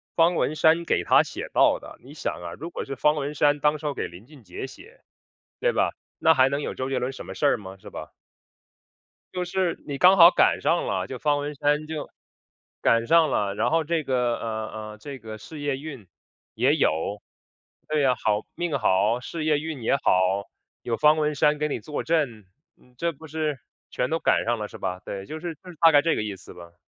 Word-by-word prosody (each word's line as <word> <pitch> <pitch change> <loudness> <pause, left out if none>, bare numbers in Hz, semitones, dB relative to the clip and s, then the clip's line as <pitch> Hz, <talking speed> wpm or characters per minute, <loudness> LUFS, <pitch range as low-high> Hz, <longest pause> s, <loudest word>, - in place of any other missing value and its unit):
方 170 +1 +4
文 155 - 0
山 160 +2 +4
给 170 - 0
他 - - +5
写 - - -6
到 - - +4
的。 - - -12
你 140 +3 -12
想 - - -2
啊， 85 -1 -6
如 165 +3 -6
果 - - -5
是 135 - -5
方 150 +4 +3
文 145 +1 -3
山 145 0 +3
当 150 +1 +2
时 150 - -11
要 145 - 0
给 - - -3
林 90 +5 -13
俊 140 -2 -17
杰 - - -7
写， 455 - -14 0.6
对 - - +2
吧， - - +1 0.3
那 160 - +6
还 130 -3 +4
能 140 +1 -2
有 - - -3
周 130 0 -3
杰 135 - -1
伦 130 +2 -2
什 - - -9
么 - - -7
事 145 - 0
儿 - - +4
吗？ 95 -2 -10
是 - - -11
吧？ - - -9 1.2
就 180 - -2
是 180 -1 -1
你 140 -2 -4
刚 185 +5 +6
好 170 0 +10
赶 - - +3
上 170 - +1
了， 95 -2 -1
就 130 - -6
方 145 -1 +1
文 145 +1 -4
山 145 +2 +1
就 155 -1 -5 0.7
赶 115 0 +3
上 165 -2 +5
了， 100 -1 0
然 115 +4 +1
后 165 +3 +2
这 160 0 -1
个， 125 -3 0
呃， 110 -1 -4 0.2
呃， 105 - -12
这 135 +5 -9
个 110 -2 -8
事 145 +9 -10
业 145 -2 -1
运 135 -8 -9 0.5
也 - - +3
有。 100 +6 0 0.7
对 155 -1 +1
呀， 130 -2 +3
好 105 -2 0
命 175 -4 -1
好、 105 +2 +2
事 155 +4 -5
业 150 -2 +3
运 155 -4 -5
也 115 - +2
好， 95 -5 +1 0.3
有 115 -1 -2
方 150 +1 +5
文 150 -1 0
山 150 +1 +3
给 150 0 0
你 - - -2
坐 150 -2 -5
镇， 140 - 0 0.3
嗯， 125 - -25
这 170 +5 0
不 160 +3 -13
是 155 -3 -2 0.3
全 125 - -1
都 165 +1 0
赶 - - +2
上 120 -1 0
了 105 - -3
是 - - -11
吧？ 95 0 -4
对， 100 -1 -6
就 155 +8 -7
是 165 0 -5
就 180 +5 -15
是 170 - -12
大 165 -1 +8
概 145 -1 +6
这 165 - +1
个 - - -1
意 105 -2 -4
思 95 - -13
吧。 85 -1 -13
145 Hz, 250 characters per minute, -25 LUFS, 115-155 Hz, 1.2 s, 好